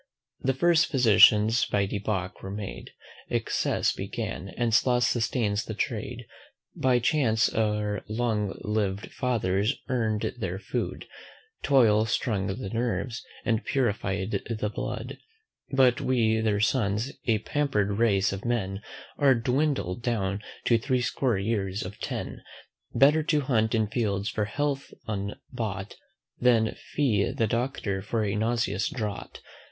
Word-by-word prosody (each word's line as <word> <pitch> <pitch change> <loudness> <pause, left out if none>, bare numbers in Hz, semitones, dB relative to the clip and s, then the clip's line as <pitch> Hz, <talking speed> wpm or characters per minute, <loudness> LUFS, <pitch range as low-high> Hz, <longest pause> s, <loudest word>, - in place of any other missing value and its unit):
The 135 0 0
first 170 +2 +4
physicians 115 -3 +5
by 100 -1 +1
debauch 95 -2 -3
were 95 - -6
made; 100 0 -6 0.4
Excess - - 0
began, 95 - -5
and 120 -2 +1
sloth 125 +2 +3
sustains 115 -3 +1
the 110 - -5
trade. 120 +1 -3 0.5
By 130 -1 +3
chace 115 -2 +2
our 105 -2 0
long 110 -3 -1
liv'd 105 -2 -1
fathers 110 -2 0
earn'd 110 -4 0
their 95 -4 -2
food; 100 - -4 0.6
Toil 115 -6 +4
strung 105 -4 0
the 95 0 -4
nerves, 120 0 -2 0.2
and 115 -3 +1
purify'd 100 -6 -1 0.2
the 110 -2 -2
blood; - - -5 0.5
But 130 -3 +4
we 115 -4 +2
their 105 -2 +1
sons, 110 +1 +1 0.2
a 110 -2 +4
pamper'd 105 -5 0
race 100 -5 +3
of 95 - -6
men, 105 -5 -1 0.4
Are 140 -3 +5
dwindled 120 - 0
down 105 -5 -1 0.2
to 115 -2 +4
threescore 125 -1 0
years 100 -1 -1
and 95 - -6
ten. - - -5 0.5
Better 150 +3 +5
to 150 -1 +1
hunt 115 -5 +1
in 110 -1 +2
fields 105 -2 -1
for 105 - -1
health 140 +5 -2
unbought, 100 0 -4 0.5
Than 115 -3 +3
fee 115 -9 0
the 115 - 0
Doctor 115 -4 -1
for 110 +2 -1
a 100 - -1
nauseous 115 +2 0
draught. 110 -8 -5
110 Hz, 130 wpm, -27 LUFS, 100-125 Hz, 0.6 s, physicians